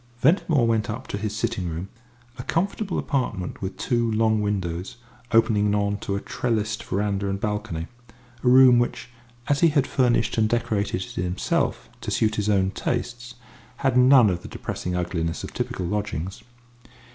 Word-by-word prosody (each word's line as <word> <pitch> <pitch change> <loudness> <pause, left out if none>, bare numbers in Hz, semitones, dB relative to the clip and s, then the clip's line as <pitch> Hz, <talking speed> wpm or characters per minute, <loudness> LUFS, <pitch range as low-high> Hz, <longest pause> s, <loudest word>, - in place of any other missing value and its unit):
Ventimore 150 -2 +3
went 115 -1 +1
up 125 +5 -4
to - - -3
his 105 0 -3
sitting 95 -5 -2
room, 85 +4 -5 0.5
a - - -4
comfortable 195 - -1
apartment 115 - -2
with 95 0 -4
two 120 -1 0
long 110 0 +2
windows 95 -3 -2 0.4
opening 105 -3 +3
on 100 0 +1
to 100 - -3
a - - -1
trellised 110 -1 -2
verandah 100 0 -1
and 100 0 -2
balcony 105 -6 -3 0.6
a 125 - +4
room 125 -1 +7
which, 120 0 -2 0.4
as 145 -1 +2
he 170 - +6
had 145 -4 +2
furnished 120 -4 +1
and 110 -1 +3
decorated 105 -5 0
it - - -10
himself 90 +1 -1
to - - -4
suit 110 -1 +1
his 105 0 0
own 95 -2 +2
tastes, 120 +2 -3 0.5
had 135 -2 +3
none 125 -4 +7
of 85 -1 -3
the - - -9
depressing 90 0 -4
ugliness 85 -2 -2
of - - -7
typical 90 - -3
lodgings. 95 -2 -3
105 Hz, 165 wpm, -24 LUFS, 100-120 Hz, 0.6 s, room